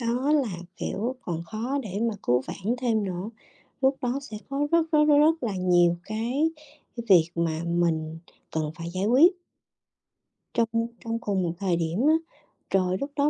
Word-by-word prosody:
đó 245 Hz, +5 st, 0 dB
là 255 Hz, -, +1 dB, 0.2 s
kiểu 235 Hz, +6 st, -2 dB
còn 170 Hz, -2 st, -3 dB
khó 230 Hz, +10 st, -3 dB
để 200 Hz, -3 st, -4 dB
mà 230 Hz, -2 st, 0 dB
cứu 125 Hz, +1 st, +2 dB
vãn 215 Hz, +6 st, -2 dB
thêm 225 Hz, -4 st, +1 dB
nữa, 185 Hz, +2 st, -4 dB, 0.5 s
lúc 265 Hz, +1 st, +3 dB
đó 250 Hz, +2 st, 0 dB
sẽ 225 Hz, -6 st, -8 dB
có 280 Hz, +1 st, 0 dB
rất, 330 Hz, -1 st, +3 dB
rất, 300 Hz, -1 st, +5 dB
rất, 295 Hz, -1 st, +5 dB
rất 320 Hz, +1 st, +4 dB
là 210 Hz, -6 st, -2 dB
nhiều 175 Hz, -1 st, +3 dB
cái 240 Hz, +9 st, 0 dB, 0.5 s
cái 235 Hz, -, -5 dB
việc 175 Hz, -4 st, +6 dB
mà 165 Hz, -1 st, -1 dB
mình 165 Hz, -2 st, 0 dB, 0.3 s
cần 155 Hz, -1 st, -2 dB
phải 170 Hz, 0 st, -6 dB
giải 185 Hz, +3 st, -2 dB
quyết 280 Hz, -, +6 dB, 1.2 s
trong 230 Hz, -1 st, +2 dB, 0.4 s
trong 230 Hz, 0 st, -2 dB
cùng 200 Hz, -4 st, -1 dB
một 170 Hz, -1 st, -1 dB
thời 190 Hz, -3 st, +1 dB
điểm 165 Hz, +3 st, -1 dB
á, 310 Hz, -, +6 dB, 0.6 s
rồi 185 Hz, -1 st, +2 dB
lúc 280 Hz, +1 st, -3 dB
đó 285 Hz, 0 st, +3 dB
215 Hz, 180 wpm, -26 LUFS, 175-265 Hz, 1.2 s, việc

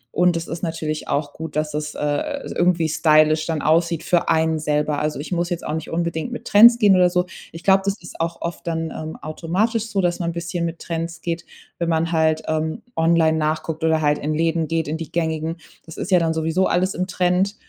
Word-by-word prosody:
Und 175 Hz, -1 st, +3 dB
es 165 Hz, -, -5 dB
ist 165 Hz, -, -5 dB
natürlich 160 Hz, -3 st, -3 dB
auch 145 Hz, 0 st, -1 dB
gut, 160 Hz, -2 st, -7 dB
dass 155 Hz, 0 st, -1 dB
es, 150 Hz, 0 st, -4 dB
äh, 280 Hz, -, -2 dB
irgendwie 175 Hz, -2 st, +2 dB
stylisch 155 Hz, 0 st, +3 dB
dann 160 Hz, -3 st, -2 dB
aussieht 165 Hz, +1 st, +2 dB
für 175 Hz, -1 st, +1 dB
einen 160 Hz, 0 st, +2 dB
selber. 150 Hz, -1 st, 0 dB
Also, 150 Hz, -1 st, -2 dB
ich 150 Hz, -, -7 dB
muss 175 Hz, -1 st, 0 dB
jetzt 175 Hz, -2 st, -4 dB
auch -, -, -3 dB
nicht 160 Hz, -, -4 dB
unbedingt 170 Hz, +3 st, -2 dB
mit 240 Hz, -, -7 dB
Trends 235 Hz, +3 st, +8 dB
gehen 205 Hz, -5 st, +5 dB
oder 180 Hz, -1 st, +5 dB
so. 180 Hz, 0 st, +1 dB, 0.3 s
Ich 165 Hz, +1 st, -10 dB
glaube, 195 Hz, -1 st, +5 dB
das 200 Hz, 0 st, 0 dB
ist 175 Hz, -, -9 dB
auch 170 Hz, 0 st, -2 dB
oft 170 Hz, 0 st, -6 dB
dann, 165 Hz, -1 st, -2 dB
ähm, 155 Hz, 0 st, -6 dB
automatisch 200 Hz, +9 st, -1 dB
so, 200 Hz, -3 st, -1 dB
dass 175 Hz, -1 st, 0 dB
man 170 Hz, -2 st, -1 dB
'n -, -, -4 dB
bisschen 170 Hz, 0 st, -3 dB
mit 165 Hz, 0 st, -4 dB
Trends 165 Hz, 0 st, -5 dB
geht, 170 Hz, 0 st, -3 dB, 0.3 s
wenn 170 Hz, -1 st, -1 dB
man 165 Hz, 0 st, +1 dB
halt, 160 Hz, -1 st, +2 dB
ähm, 155 Hz, 0 st, -2 dB
online 165 Hz, -1 st, +3 dB
nachguckt 155 Hz, +1 st, -2 dB
oder 160 Hz, -1 st, +2 dB
halt 150 Hz, -1 st, +2 dB
in 150 Hz, +1 st, -2 dB
Läden 165 Hz, 0 st, 0 dB
geht, 165 Hz, -1 st, -1 dB
in 155 Hz, +2 st, -2 dB
die 160 Hz, -3 st, -7 dB
gängigen. 160 Hz, -1 st, -1 dB, 0.3 s
Das 160 Hz, -1 st, -12 dB
ist -, -, -4 dB
ja 180 Hz, -, +6 dB
dann 165 Hz, -1 st, 0 dB
sowieso 160 Hz, +4 st, +1 dB
alles 185 Hz, +2 st, +1 dB
im 185 Hz, +1 st, -2 dB
Trend, 185 Hz, +2 st, +1 dB
165 Hz, 225 wpm, -21 LUFS, 155-175 Hz, 0.3 s, Trends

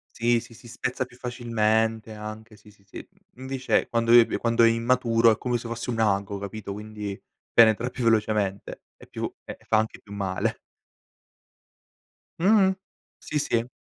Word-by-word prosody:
Sì, 120 Hz, 0 st, +2 dB
sì, 115 Hz, -, -14 dB
si 120 Hz, -, -16 dB
spezza 125 Hz, +2 st, -3 dB
più 125 Hz, -, -18 dB
facilmente 115 Hz, -3 st, 0 dB
anche 110 Hz, +1 st, -9 dB
sì, 105 Hz, -2 st, -18 dB
sì, 100 Hz, -1 st, -27 dB
sì, 100 Hz, -, -10 dB, 0.3 s
invece 130 Hz, 0 st, -1 dB
quando 115 Hz, 0 st, 0 dB
ebe 120 Hz, -1 st, +6 dB
quando 115 Hz, 0 st, +3 dB
è -, -, +7 dB
immaturo, 115 Hz, 0 st, +3 dB
è 110 Hz, -, +1 dB
come 125 Hz, -1 st, -1 dB
se 115 Hz, -, -8 dB
fosse 120 Hz, +1 st, -4 dB
un 115 Hz, -, -2 dB
ago, 100 Hz, -1 st, 0 dB
capito, 100 Hz, 0 st, -6 dB
quindi 105 Hz, -1 st, -7 dB, 0.3 s
penetra 115 Hz, +1 st, +5 dB
più 125 Hz, -1 st, -5 dB
velocemente, 105 Hz, -3 st, 0 dB
e -, -, -16 dB
più -, -, -5 dB
e -, -, -8 dB
e -, -, -23 dB
fa 110 Hz, -, +2 dB
anche 110 Hz, 0 st, -2 dB
più 100 Hz, -, -15 dB
male. 95 Hz, -2 st, -2 dB, 1.8 s
Mh-mh, 190 Hz, 0 st, +4 dB, 0.4 s
sì, 150 Hz, -, -3 dB
sì. 120 Hz, -4 st, -1 dB
115 Hz, 165 wpm, -25 LUFS, 105-120 Hz, 1.8 s, è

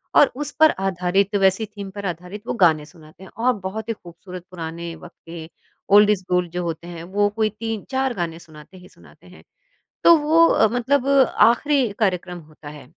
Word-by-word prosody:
और -, -, +6 dB
उस 295 Hz, +1 st, -5 dB
पर 315 Hz, 0 st, +7 dB
आधारित 190 Hz, +2 st, 0 dB
वैसी 195 Hz, +3 st, +2 dB
थीम 205 Hz, -2 st, -9 dB
पर 200 Hz, -1 st, -6 dB
आधारित 180 Hz, +3 st, -6 dB
वो -, -, -1 dB
गाने 155 Hz, -3 st, +3 dB
सुनाते 160 Hz, +2 st, -17 dB
हैं 190 Hz, -, -12 dB, 0.2 s
और 255 Hz, -, +4 dB
बहुत 210 Hz, +4 st, -6 dB
ही -, -, 0 dB
खूबसूरत 180 Hz, -1 st, -12 dB
पुराने 170 Hz, -1 st, -6 dB
वक़्त 160 Hz, -, -14 dB
के, 165 Hz, -1 st, -8 dB, 0.5 s
ओल्ड 210 Hz, 0 st, +7 dB
इज 205 Hz, -3 st, +1 dB
गोल्ड 180 Hz, -1 st, 0 dB
जो 180 Hz, +1 st, -3 dB
होते 170 Hz, 0 st, -5 dB
हैं, 170 Hz, -1 st, -8 dB
वो 205 Hz, +4 st, 0 dB
कोई 220 Hz, -1 st, +1 dB
3 225 Hz, -2 st, -4 dB
4 265 Hz, -1 st, 0 dB
गाने 170 Hz, -5 st, -4 dB
सुनाते 160 Hz, +2 st, -15 dB
ही 180 Hz, -, -15 dB
सुनाते -, -, -20 dB
हैं। -, -, -16 dB, 0.6 s
तो 340 Hz, -, +8 dB
वो 320 Hz, +3 st, +4 dB
अ, 220 Hz, -, +3 dB
मतलब 255 Hz, +3 st, 0 dB
आख़िरी 270 Hz, -1 st, +3 dB
कार्यक्रम 180 Hz, -4 st, -1 dB
होता 150 Hz, -1 st, -13 dB
है, 145 Hz, -3 st, -11 dB
190 Hz, 195 wpm, -21 LUFS, 170-225 Hz, 0.6 s, तो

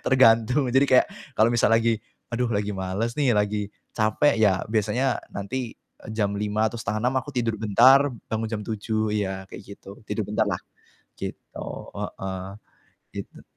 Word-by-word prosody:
Tergantung, 125 Hz, +1 st, +4 dB
jadi 135 Hz, +2 st, +4 dB
kayak 130 Hz, -, +5 dB, 0.3 s
kalau 110 Hz, +2 st, +5 dB
misal 115 Hz, -3 st, +3 dB
lagi, 115 Hz, -1 st, +2 dB, 0.3 s
"Aduh, 120 Hz, +1 st, 0 dB
lagi 105 Hz, -2 st, -1 dB
males 95 Hz, +4 st, -2 dB
nih, 130 Hz, -6 st, +3 dB
lagi 105 Hz, 0 st, 0 dB, 0.3 s
capek," 115 Hz, +4 st, +2 dB
ya, 100 Hz, -4 st, +3 dB
biasanya 115 Hz, +5 st, +1 dB, 0.2 s
nanti, 115 Hz, +4 st, -4 dB
eee, -, -, -18 dB
jam 105 Hz, -2 st, +1 dB
5:00 105 Hz, +1 st, 0 dB
atau 120 Hz, -, -7 dB
5:30 110 Hz, +4 st, -1 dB
aku 140 Hz, +1 st, -7 dB
tidur 115 Hz, -3 st, 0 dB
bentar, 130 Hz, +6 st, +6 dB, 0.2 s
bangun 110 Hz, 0 st, -1 dB
jam 110 Hz, -2 st, -3 dB
7:00, 110 Hz, 0 st, -2 dB
iya, 95 Hz, -2 st, -2 dB
kayak -, -, -9 dB
gitu, 100 Hz, +1 st, -12 dB
tidur 110 Hz, -, -2 dB
bentar 110 Hz, 0 st, +1 dB
lah, 90 Hz, -3 st, -1 dB, 0.6 s
gitu, -, -, -7 dB, 0.3 s
heeh, 95 Hz, -1 st, -5 dB, 0.7 s
gitu. -, -, -8 dB
110 Hz, 155 wpm, -25 LUFS, 105-120 Hz, 0.7 s, bentar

